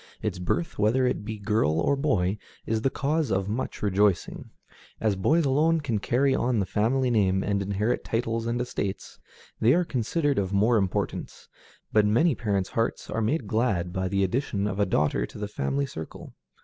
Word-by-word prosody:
Its 90 - -2
birth, 160 - -2
whether 115 +5 +3
it 125 - -1
be 110 +1 -5
girl 100 -7 +1
or 115 +12 +2
boy, 105 -9 0 0.3
is 110 0 -1
the 135 - +2
cause 150 +1 -1
of 95 0 0
much 110 +3 -4
rejoicing. 100 -2 +1 0.5
As 110 -3 +1
boys 150 - +2
alone 155 +5 +3
can 120 -8 -1
carry 130 +6 +2
on 125 -2 +1
the 100 - +1
family 125 +7 +1
name 95 -4 +2
and 100 -1 0
inherit 100 +5 -1
titles 115 0 -2
and 120 +1 -1
estates, 100 -5 -4 0.4
they 120 +6 +4
are 180 0 +2
considered 140 +2 0
of 95 -1 -2
more 110 +4 +3
importance, 95 -3 -2 0.5
but 110 - +5
many 120 +11 +3
parents' 100 -5 -1
hearts 115 0 -2
are 115 - -1
made 125 +4 0
glad 100 -6 0
by 95 -1 -1
the 100 +1 +1
addition 100 0 -1
of 105 -1 -2
a 100 - +2
daughter 75 -8 +1
to - - -12
the 105 0 -3
family 140 +6 -1
circle. 80 - -9
110 Hz, 185 wpm, -26 LUFS, 100-130 Hz, 0.5 s, but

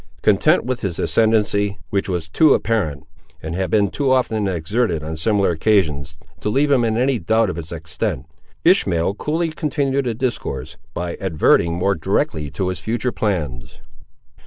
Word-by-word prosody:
Content - - +3
with 125 -1 -2
his 95 -6 -3
ascendency, 105 -2 +1
which 100 -1 -1
was 85 -3 -2
too 145 - +4
apparent, 80 -11 -1 0.4
and 80 +1 -6
had 95 0 -2
been 100 0 +2
too 140 -3 0
often 110 -5 +1
exerted 90 0 -1
on 80 +1 -4
similar 100 +3 +2
occasions, 80 -5 +1 0.2
to - - -2
leave 140 +6 +2
him 130 -4 +4
in 110 -1 0
any 130 0 +1
doubt 110 +3 +2
of 85 - -8
its 80 -1 -8
extent, 80 -4 -3 0.4
Ishmael 85 +3 +3
coolly 160 +8 -2
continued 140 -3 -1
the 120 -2 -1
discourse, 125 +1 -3 0.2
by 85 0 -3
adverting 85 -2 +2
more 95 +3 +1
directly 80 -3 -1
to 90 +6 -2
his 90 -3 -4
future 120 +5 -1
plans. 75 - -3
100 Hz, 160 wpm, -20 LUFS, 80-120 Hz, 0.4 s, too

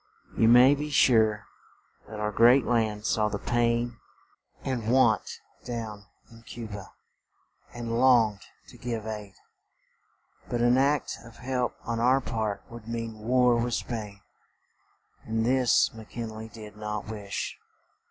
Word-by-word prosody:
You 110 - +3
may 125 +4 +7
be 150 +1 -3
sure 110 -7 +3 0.6
that 105 - -7
our 105 0 -1
great 120 +5 +5
land 110 -3 0
saw 105 0 +1
the 105 - -3
pain 120 +2 0 0.6
and 120 -4 -2
want 120 -5 +2 0.3
down 110 -4 -6 0.2
in 115 0 -15
Cu 115 0 -8
ba, 105 -3 -9 0.8
and 115 -1 -3
longed 115 -6 +4 0.3
to - - -15
give 115 -3 -4
aid; 105 -3 -6 1.1
but 120 - -1
an 120 +2 +4
act 140 +1 +1
of 115 -1 -14
help 125 -1 -2
on 115 0 -3
our 125 +3 +4
part 110 -5 -3
would 115 -1 -11
mean 115 -1 -5
war 125 +2 +3
with 120 0 0
Spain, 105 -4 -5 1.0
and 110 0 -1
this 125 -1 +3
Mc 110 -1 -12
Kin 115 -2 -5
ley 110 +1 -7
did 105 -1 -12
not 105 0 -4
wish. 105 -3 -5
115 Hz, 145 wpm, -27 LUFS, 110-120 Hz, 1.1 s, may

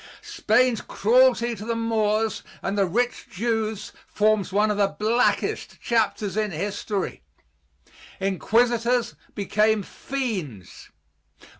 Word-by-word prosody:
Spain's 250 - +2
cruelty 240 +1 +3
to 210 -2 -8
the 230 +1 -2
Moors 220 -1 0 0.2
and 195 - -1
the 200 -2 +2
rich 240 +7 -1
Jews 220 0 -2 0.2
forms 210 -2 +1
one 210 +2 +2
of 205 - -2
the 200 -1 +3
blackest 230 +4 0
chapters 215 -4 0
in 215 -1 0
history. 200 +3 -3 1.0
Inquisitors 235 +5 +1 0.2
became 210 +1 +1
fiends. 190 - -5
215 Hz, 105 wpm, -24 LUFS, 200-235 Hz, 1.0 s, cruelty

